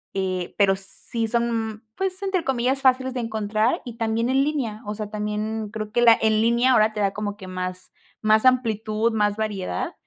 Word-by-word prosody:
eh, 185 -2 -2
pero 195 -2 +4
sí 210 +4 -4
son, 225 -1 -1
pues 380 -1 -2
entre 380 -3 0
comillas, 265 0 0
"fáciles 260 0 +3
de 255 - -3
encontrar" 220 0 0
y 235 -2 -8
también 230 +1 0
en 265 +1 +3
línea. 260 -8 -2
O 210 - -3
sea, 210 0 -6
también 210 +1 -3
creo 215 0 -6
que 240 - +1
la 230 -1 +7
en 220 -1 +2
línea 235 +3 +3
ahora 215 -1 +4
te 210 - -5
da 200 -1 +2
como 205 0 -4
que 190 - -10
más 185 0 -5 0.3
más 215 0 +4
amplitud, 225 -3 +2
más 210 -1 +1
variedad. 195 - -3
220 Hz, 190 wpm, -23 LUFS, 210-240 Hz, 0.3 s, la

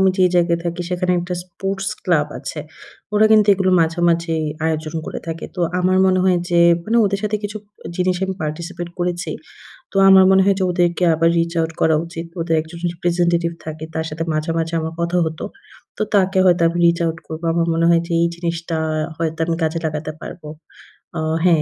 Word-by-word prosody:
আমি 190 - +5
যে 185 - +5
জায়গায় 170 -1 +3
থাকি 170 +1 -3
সেখানে 180 0 0
একটা 180 +1 -4
স্পোর্টস 195 +2 -4 0.2
ক্লাব 160 -5 +2
আছে। 150 +2 -6 0.5
ওরা 215 +1 +5
কিন্তু 215 -1 +5
এগুলো 190 -1 +1
মাঝেমাঝেই 165 0 +1 0.2
আয়োজন 155 0 -2
করে - - -5
থাকে। 165 0 -5
তো 180 - -5 0.2
আমার 185 +1 +2
মনে 185 0 +3
হয় 185 -1 +4
যে, 170 - +4 0.2
মানে 225 +2 0
ওদের 200 0 0
সাথে 210 0 0
কিছু 205 +1 -4 0.4
জিনিস 180 0 +1
আমি 190 - -3
participate 170 +3 -5
করেছি। 175 0 -2 0.6
তো - - -21
আমার 190 0 +8
মনে 190 0 +5
হয় 195 -1 +3
যে 190 - +1
ওদেরকে 175 0 +1
আবার 165 +1 +3
reach 170 +1 0
out 160 - -2
করা 160 - +4
উচিত। 165 0 -7
ওদের 165 -1 0
একজন 160 +2 -11 0.2
representative 170 0 0
থাকে 155 0 -6
তার 160 0 -2
সাথে 160 +2 -4
মাঝে, 155 +1 -1
মাঝে 165 0 -2
আমার 160 +1 -4
কথা 170 +1 0
হত। 160 0 -5 0.6
তো - - -4
তাকে 190 0 +2
হয়তো 175 -2 +4
আমি 170 +1 -2
reach 170 0 +3
out 165 0 -2
করব। 160 +1 -6
আমার 170 0 +1
মনে 165 +1 +1
হয় 170 -1 +4
যে - - -7
এই 170 - +3
জিনিসটা 170 -1 -3 0.4
হয়তো 160 -1 -2
আমি 165 0 -1
কাজে 160 +1 0
লাগাতে 155 0 -3
পারবো। 160 -4 -9 0.7
অ - - -1 0.2
হ্যাঁ, 165 -4 +4
170 Hz, 195 wpm, -19 LUFS, 165-180 Hz, 0.7 s, আমার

